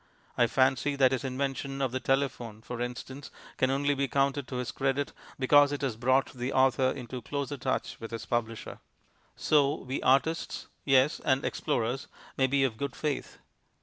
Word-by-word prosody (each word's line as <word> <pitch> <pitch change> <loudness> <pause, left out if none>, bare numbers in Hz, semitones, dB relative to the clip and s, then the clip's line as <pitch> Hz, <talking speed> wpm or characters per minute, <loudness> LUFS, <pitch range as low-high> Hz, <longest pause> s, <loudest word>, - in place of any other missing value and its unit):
I 120 - +4
fancy 135 +3 +2
that 135 -2 +4
his 130 - -1
invention 135 +1 -3
of 135 -3 0
the 130 - -2
telephone 125 -5 -1
(for 120 0 -6
instance) 130 +3 -6 0.3
can 130 - +2
only 140 +2 +1
be 140 0 0
counted 140 0 0
to 130 - -6
his 125 -1 -2
credit 135 +1 -1 0.2
because 145 +2 +5
it 145 -1 -3
has 130 -5 -1
brought 130 +4 +2
the 125 +1 -3
author 130 -1 +3
into 125 -1 -5
closer 140 +2 -3
touch 130 -1 -2
with 115 - -7
his 115 -1 -6
publisher. 115 -2 -3 0.6
So 145 -2 +3
we 130 +2 -5
artists 140 +6 +1 0.2
(yes, 135 +1 +3
and 135 0 +2
explorers) 125 -2 -1 0.3
may 130 - +3
be 135 +1 +2
of 120 -5 0
good 140 0 -3
faith. 150 -3 -3
135 Hz, 175 wpm, -29 LUFS, 125-140 Hz, 0.6 s, because